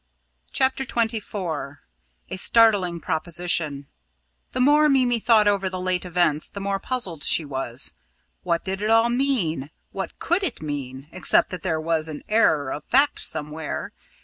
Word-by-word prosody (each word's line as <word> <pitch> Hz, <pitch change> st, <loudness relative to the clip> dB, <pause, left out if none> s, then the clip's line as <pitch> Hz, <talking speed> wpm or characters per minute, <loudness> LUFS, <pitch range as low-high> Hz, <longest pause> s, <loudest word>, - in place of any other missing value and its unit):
CHAPTER 265 Hz, 0 st, +1 dB
XXIV 205 Hz, -, -3 dB, 0.5 s
A -, -, -2 dB
STARTLING 195 Hz, -5 st, +3 dB
PROPOSITION 160 Hz, -3 st, -1 dB, 0.7 s
The -, -, -4 dB
more 295 Hz, +3 st, +5 dB
Mimi 250 Hz, -4 st, +3 dB
thought 220 Hz, -2 st, +4 dB
over 195 Hz, -2 st, +1 dB
the 185 Hz, 0 st, -5 dB
late 185 Hz, 0 st, -1 dB
events, 170 Hz, -4 st, +2 dB
the 200 Hz, -, -8 dB
more 195 Hz, 0 st, -2 dB
puzzled 190 Hz, -, -2 dB
she 160 Hz, -, +2 dB
was. 135 Hz, -3 st, -2 dB, 0.5 s
What 170 Hz, 0 st, -1 dB
did 190 Hz, +1 st, -3 dB
it 215 Hz, -, -1 dB
all 225 Hz, +1 st, +4 dB
mean 235 Hz, -, 0 dB, 0.2 s
what -, -, -6 dB
could 350 Hz, +4 st, 0 dB
it 375 Hz, -, -2 dB
mean, 140 Hz, -2 st, -6 dB
except 185 Hz, -, +2 dB
that 180 Hz, -2 st, -6 dB
there 165 Hz, -4 st, -1 dB
was 160 Hz, 0 st, 0 dB
an 150 Hz, -, -7 dB
error 155 Hz, -11 st, +2 dB
of 150 Hz, -, -5 dB
fact 280 Hz, +3 st, +3 dB
somewhere. 150 Hz, +1 st, -4 dB
185 Hz, 150 wpm, -23 LUFS, 155-230 Hz, 0.7 s, more